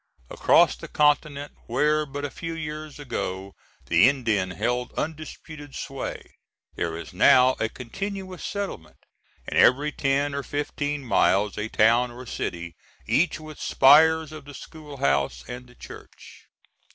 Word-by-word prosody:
Across - - +4
the - - -9
continent 150 -1 +1 0.2
where 150 +5 +1
but 145 +1 -5
a 140 - -5
few 165 -1 -6
years 155 -1 -6
ago 100 -8 -5 0.3
the 85 +9 +5
Indian 115 -9 0
held 120 +6 -2
undisputed 155 -2 -6
sway, 135 -1 -5 0.5
there 80 -1 -3
is 85 - -9
now 130 0 +5
a 110 - 0
continuous 190 - -6
settlement, 195 - -5 0.5
and - - 0
every 145 +4 +4
ten 140 0 0
or 140 - -2
fifteen 145 0 -3
miles 105 -3 +2
a 105 - -3
town 115 +4 +3
or 125 +1 -10
city, 85 -7 -5 0.3
each 155 +1 +1
with 155 -1 -11
spires 160 +3 +5
of 155 -2 -10
the 145 -1 -11
school 150 -3 -11
house 70 - 0
and 125 +1 -8
the 125 - -19
church. - - -13
140 Hz, 140 wpm, -25 LUFS, 115-150 Hz, 0.5 s, the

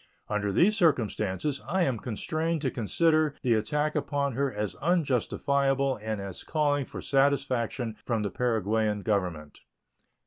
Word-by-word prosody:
Under 105 -1 0
these 195 - +4
circumstances 130 - +1
I 180 +5 +1
am 130 -8 0
constrained 155 +8 -2
to 130 - 0
consider 155 +6 +2
the 125 -3 +3
attack 150 +8 0
upon 140 -2 -1
her 140 +2 0
as 105 -4 -3
unjustifiable 140 -3 +1
and 110 -1 -3
as 100 -2 -6
calling 145 -3 +1
for - - -8
satisfaction 135 -4 +1
from 115 -3 -1
the 100 - -2
Paraguayan 110 -3 0
Government. 90 -8 -2
130 Hz, 135 wpm, -28 LUFS, 105-145 Hz, -, these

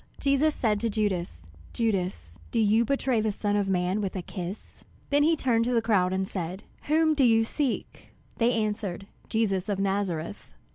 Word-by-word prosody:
Jesus 280 +2 +2
said 215 -3 +1
to 230 +2 0
Judas, 190 - -2 0.3
"Judas, 180 - -2
do - - -3
you 220 +1 +4
betray 255 -2 +1
the 215 0 0
Son 205 0 -1
of 205 -1 +1
man 185 +2 +1
with 195 -1 -3
a 185 - -3
kiss?" 180 +2 -7 0.3
Then 285 +1 +4
he 320 +3 +4
turned 240 -6 +2
to 245 - 0
the - - +5
crowd, 195 -5 +2
and 190 0 -1
said, 185 +1 -5 0.2
"Whom 315 +1 +3
do 285 -3 +2
you 225 -2 +5
seek?" 270 +3 -3 0.3
They 235 +1 +3
answered, 210 -4 -2 0.2
"Jesus 210 -4 0
of 200 - 0
Nazareth." 195 -3 -2
210 Hz, 180 wpm, -27 LUFS, 190-235 Hz, 0.3 s, the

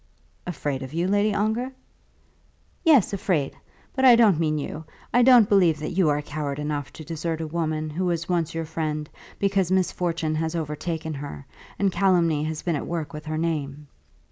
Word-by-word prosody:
"Afraid 145 -6 -3
of 135 +3 -7
you, 170 +2 +1
Lady 205 +2 +2
Ongar?" 220 +6 -1 1.1
"Yes, 290 - +5
afraid; 175 -8 0 0.4
but 265 - 0
I 250 -2 +9
don't 215 -8 +5
mean 155 -2 +1
you. 150 +2 -5 0.3
I 245 - +5
don't 245 -4 +7
believe 180 -7 +4
that 150 - -4
you 175 -3 +2
are 145 0 0
coward 145 -1 -4
enough 150 -2 -3
to 155 - -9
desert 165 +1 -3
a 160 - -3
woman 155 -1 -2
who 180 +5 -2
was 170 -2 -1
once 170 -3 -1
your 165 0 -2
friend 155 -1 -3 0.3
because 195 -2 +1
misfortune 170 -3 0
has 160 +1 -2
overtaken 160 0 -3
her, 140 -1 -7 0.3
and 200 -1 +2
calumny 170 -6 +2
has 155 0 -4
been 170 -3 0
at 145 - -4
work 160 -4 -4
with 150 0 -8
her 155 0 -2
name." 150 -3 -2
165 Hz, 180 wpm, -25 LUFS, 150-185 Hz, 1.1 s, I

